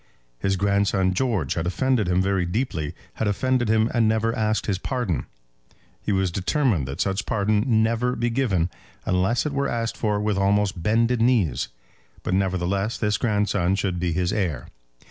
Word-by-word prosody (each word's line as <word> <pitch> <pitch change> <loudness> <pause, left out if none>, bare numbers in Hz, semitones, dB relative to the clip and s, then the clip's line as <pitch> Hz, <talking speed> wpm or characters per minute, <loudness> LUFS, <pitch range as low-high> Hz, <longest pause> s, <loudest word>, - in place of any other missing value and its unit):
His 95 0 +1
grandson 100 -1 +1
George 95 - 0
had 85 0 -2
offended 120 +2 +1
him 90 +1 +2
very 95 -1 +1
deeply, 85 - -2 0.2
had 110 - 0
offended 120 +3 +1
him 110 0 +3
and 115 -3 +3
never 110 +1 +1
asked 110 -1 0
his 95 -3 -1
pardon. 120 - -2 0.7
He - - -2
was 95 -2 +1
determined 95 - 0
that 70 +5 -6
such 95 +1 -1
pardon 105 -1 +1
should 130 - -3
never 115 +2 +2
be 120 0 -1
given, 100 -9 +1 0.3
unless 95 +9 +1
it 150 - -2
were 140 0 0
asked 115 -1 -2
for 105 -2 0
with 105 -1 0
almost 100 -1 +1
bended 115 +5 +2
knees; 115 - +2 0.6
but, 90 - -1
nevertheless, 95 +2 0
this 105 -2 0
grandson 105 -5 +1
should 95 -2 -1
be 90 -1 0
his 90 +3 0
heir. 90 -10 -2
105 Hz, 170 wpm, -24 LUFS, 95-115 Hz, 0.7 s, him